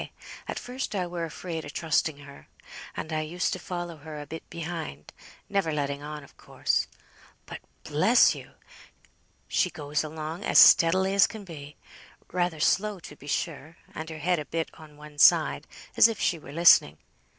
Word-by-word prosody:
At - - -4
first 250 -2 -5
I 185 -2 0
were 175 -1 -4
afraid 165 0 -6
o' - - -8
trusting 160 0 0
her, 140 0 -14 0.5
and 160 - -5
I 155 - 0
used 170 +4 -2
to 185 - -4
follow 175 -2 -6
her 150 0 -9
a 145 - -7
bit 160 +2 -9
behind; 165 - -6 0.3
never 195 -5 0
letting 140 -1 -2
on, 150 0 -7
of 140 - -18
course. - - -1 0.6
But, - - -8 0.2
bless - - +4
you! - - -11 0.9
she - - +1
goes 145 +1 -3
along 155 +4 -6
as - - +2
steadily 190 +3 +7
as 200 - +5
can 220 -2 -9
be; 150 -5 -10 0.5
rather 175 -3 -1
slow, 205 +5 +1
to 150 - -11
be 145 - -15
sure, 155 +1 -3 0.2
and 160 +1 -6
her 160 - -7
head 175 +2 0
a 150 - -5
bit 165 +1 -3
on 150 -2 -15
one 150 0 -13
side - - +5 0.3
as - - +8
if 225 -3 -4
she 170 - 0
were 140 - -12
listening. 150 - +5
160 Hz, 175 wpm, -27 LUFS, 150-175 Hz, 0.9 s, as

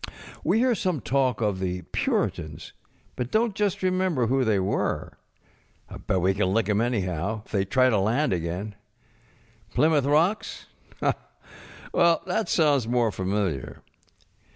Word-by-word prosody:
We - - +2
hear 250 +1 +3
some 185 -7 -1
talk 130 -2 0
of 105 -4 0
the 90 -1 -3
Puritans, - - -2 0.4
but 125 0 -4
donŌĆÖt 220 0 +2
just 205 -2 -1
remember 185 -8 +1
who 130 +3 +2
they 110 -4 +2
were. 95 - -2 0.9
Bet 95 - +2
we 95 +2 +3
can 95 -1 0
lick 110 +2 +2
ŌĆÖem, 105 0 +1
anyhow, 105 -3 -1
if - - -20
they 100 -2 +1
try 130 +5 +3
to 105 - +2
land 115 +7 +1
again. 90 +5 -3 1.0
Plymouth 150 -3 +3
Rocks? 165 +9 +1 1.3
Well, 170 -1 +3
that 190 +4 -1
sounds 145 -7 +3
more 120 -2 +2
familiar. 95 -7 -2
120 Hz, 135 wpm, -25 LUFS, 100-160 Hz, 1.3 s, hear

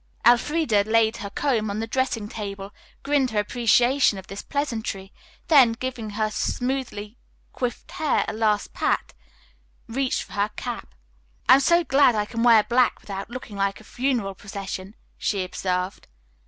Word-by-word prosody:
Elfreda 240 -2 +4
laid 225 +1 +2
her 200 - -6
comb 225 -2 0
on 200 +1 -3
the 225 - -1
dressing 230 -3 -1
table, 200 -2 -6 0.3
grinned 280 -2 +2
her 215 -2 0
appreciation 240 +2 +3
of 190 - -8
this 195 +1 -7
pleasantry, 220 -9 -3 0.3
then, 270 -8 +6
giving 245 -2 -5
her 215 -1 0
smoothly 245 -3 -3 0.3
coiffed 245 -2 -4
hair 310 -3 +1
a - - -3
last 215 -2 0
pat, - - -1 0.7
reached 260 +3 -1
for - - -14
her 205 +1 0
cap. 240 - -6 0.5
"I - - +9
am 265 - +7
so 340 +5 +4
glad 270 -5 +4
I 210 -1 0
can 230 +2 -4
wear 230 -3 +6
black 245 +2 +2
without 195 0 -7
looking 240 -4 -8
like 195 0 0
a - - -15
funeral 240 -4 -1
procession," 195 0 -7 0.2
she 200 -3 0
observed. 185 +1 -3
225 Hz, 155 wpm, -24 LUFS, 205-255 Hz, 0.7 s, I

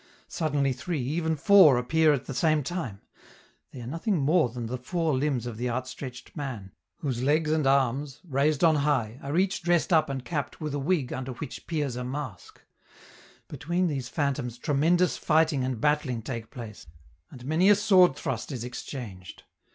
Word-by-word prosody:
Suddenly 145 -5 0
three, 155 +5 -4
even 160 +4 -1
four, 155 -4 +6
appear 155 +6 +3
at 140 -3 -1
the 135 - -5
same 155 +2 +2
time; 130 - -5 0.7
they 125 - -10
are - - -7
nothing 165 - -1
more 155 -1 +3
than 120 0 -6
the 125 +2 -4
four 160 +3 -1
limbs 130 -3 0
of 120 -3 -6
the 125 +2 -2
outstretched 130 +1 -6
man, 120 -10 -6 0.3
whose 130 -5 -2
legs 150 +3 +2
and 155 -3 +1
arms, 135 +1 +1
raised 145 -1 0
on 160 -2 +5
high, 135 -5 0
are 140 +4 -3
each 190 +1 +1
dressed 175 +1 +1
up 155 -3 +4
and 135 -2 -4
capped 150 -5 -4
with 150 -2 -4
a 145 - -1
wig 145 -2 0
under 130 0 -4
which 135 +2 -8
peers 145 -6 -2
a 125 - -4
mask; 130 -4 -7 0.8
between 170 +6 -1
these 135 -7 -2
phantoms 140 -5 -2
tremendous 165 +6 +2
fighting 155 -3 +2
and 130 -3 -2
battling 135 -4 0
take 115 -3 -5
place, 115 - -9 0.4
and 125 -1 -12
many 160 +7 +3
a 205 - +8
sword 190 -7 +5
thrust 135 -2 -4
is 125 -4 -4
exchanged. 120 -6 -8
140 Hz, 175 wpm, -27 LUFS, 125-160 Hz, 0.8 s, a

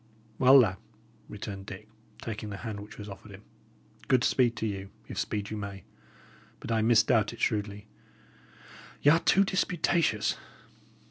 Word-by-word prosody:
"Well, 130 +2 +8
lad," 105 -8 +4 0.5
returned 100 -1 -7
Dick, 105 +1 -9 0.4
taking 105 -1 -5
the 100 - -6
hand 110 -3 -4
which 105 +1 -11
was 105 - -8
offered 100 +1 -10
him, 100 +1 -12 0.6
"good 130 -1 +3
speed 120 -3 +3
to 110 - -3
you, 100 -2 -4 0.2
if - - -5
speed 105 -1 -3
you 110 - -3
may. 100 -2 -6 0.8
But - - -6
I 110 -1 +2
misdoubt 110 0 +3
it 115 - -12
shrewdly. 105 -1 -1 1.2
Y' 145 - +7
are 165 - +5
too 195 +3 +4
disputatious." 170 - +1
105 Hz, 150 wpm, -29 LUFS, 100-120 Hz, 1.2 s, Well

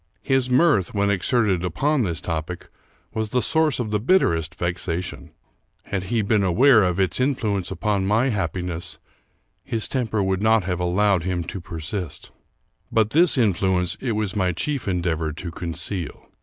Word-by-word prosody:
His 135 -2 +1
mirth, 125 - +3
when 100 0 +2
exerted 100 -2 +1
upon 135 - +1
this 85 -7 -2
topic, 85 +1 -4 0.4
was 110 -1 -2
the 125 - +1
source 160 -3 +2
of 110 -4 -2
the 105 - +1
bitterest 85 - +2
vexation. 90 0 -4 0.5
Had 95 -2 -3
he 115 +2 0
been 105 0 +2
aware 115 +6 +5
of 90 -1 +1
its 95 +1 0
influence 110 -8 0
upon 100 -3 -1
my 115 +6 +2
happiness, 90 -4 -3 0.7
his 115 -2 -3
temper 110 -6 -1
would 95 0 0
not 110 -1 +4
have 90 -1 -2
allowed 95 +1 +2
him 90 0 -2
to 95 +3 -6
persist; 85 +2 -6 0.6
but 110 -1 +2
this 165 -1 +4
influence 95 -5 +1
it 125 -4 -2
was 105 -2 -2
my 95 -3 +1
chief 140 - -2
endeavor 85 -4 -1
to 85 +2 -6
con 85 0 -5
ceal. 90 -1 -4
100 Hz, 160 wpm, -23 LUFS, 90-115 Hz, 0.7 s, aware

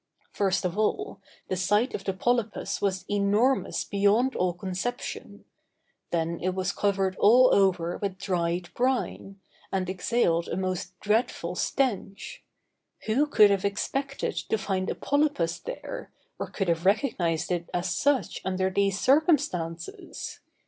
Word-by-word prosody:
First 190 -2 0
of 180 +3 -2
all, 400 - -1 0.3
the 185 - -1
size 205 +7 +1
of 195 - -4
the 195 - 0
polypus 235 +2 -1
was 190 -2 -1
enormous 205 +6 +1
beyond 205 +6 +2
all 180 0 +1
conception; 190 +7 -5 0.6
then 170 0 -1
it 185 +1 -1
was 185 0 0
covered 195 -2 0
all 250 +5 +6
over 180 -3 +2
with 195 -2 -3
dried 175 -2 -1
brine, 245 -6 -1 0.3
and 190 -1 -1
exhaled 180 -3 +1
a - - -3
most 185 -1 -3
dreadful 210 -5 0
stench. 245 - -2 0.6
Who 265 +7 +2
could 210 -8 +6
have 195 -1 +1
expected 275 +7 -2
to 220 - -1
find 190 -2 -2
a - - -2
polypus 285 - 0
there, - - -7 0.3
or - - -4
could 195 - -2
have 170 -1 +1
recognized 185 - +1
it 170 -1 -2
as 175 +1 -1
such 285 -2 +1
under 190 0 0
these 200 0 +1
circumstances? 260 - 0
195 Hz, 135 wpm, -27 LUFS, 180-240 Hz, 0.6 s, all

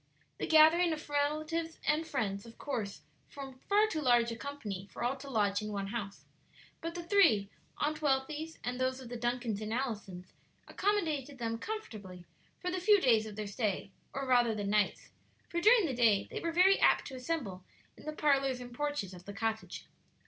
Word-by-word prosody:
The - - -2
gathering 320 +2 +6
of 310 - -7
relatives 310 +3 -1
and 310 +2 +2
friends 205 -9 -2
of 230 - -14
course 220 -8 -4 0.3
formed 270 -2 -9
far 415 +2 +5
too 325 -8 -2
large 240 -3 +4
a - - -4
company 215 -8 -6
for - - -6
all 245 +3 +1
to 275 +1 -9
lodge 205 -4 +1
in 215 0 -4
one 200 -1 -2
house, 205 -4 -5 0.6
but 330 +1 -4
the 345 - -4
three 285 - +4 0.3
Aunt 305 +1 -1
Wealthy's 300 +3 -1
and 250 +1 -3
those 255 0 0
of 255 -3 -9
the 245 - -5
Duncans 240 -3 -2
and 215 0 -4
Allisons 210 -7 -4 0.3
accommodated 315 -9 -1
them 230 -1 -3
comfortably 210 - -7 0.3
for 360 - -2
the 365 0 -2
few 410 +2 +6
days 225 -8 +3
of 210 - -8
their 215 0 -4
stay, 200 -1 -2 0.2
or 275 0 -3
rather 245 -3 +3
the 205 - -3
nights, 205 0 0 0.4
for 345 - -1
during 435 +1 +6
the 280 - -1
day 225 -5 +3
they - - -3
were 335 - -2
very 370 +3 +5
apt - - +4
to 265 - -7
assemble 250 - -3 0.3
in - - -15
the - - -1
parlors 275 -4 +2
and 245 -1 -9
porches 290 -8 -2
of 180 0 -12
the 200 - -7
cottage. 220 +1 -3
255 Hz, 190 wpm, -32 LUFS, 215-310 Hz, 0.6 s, gathering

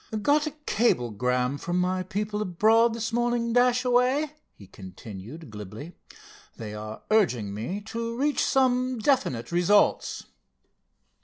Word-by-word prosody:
"Got 300 +4 +3
a - - -3
cablegram 125 - 0
from 175 -1 -2
my 185 +1 0
people 210 +3 -3
abroad 220 +5 +3
this 225 0 -4
morning, 240 -1 0
Dashaway," 250 +4 +2 0.2
he 100 - -14
continued 105 - -10
glibly. 105 - -9 0.6
"They 105 -2 -7
are 110 +1 -8
urging 125 - +2
me 120 - -4
to 230 +2 -5
reach 290 +2 +1
some 255 -1 +2
definite 220 - 0
results." 180 +4 +2
205 Hz, 115 wpm, -26 LUFS, -, 0.6 s, Got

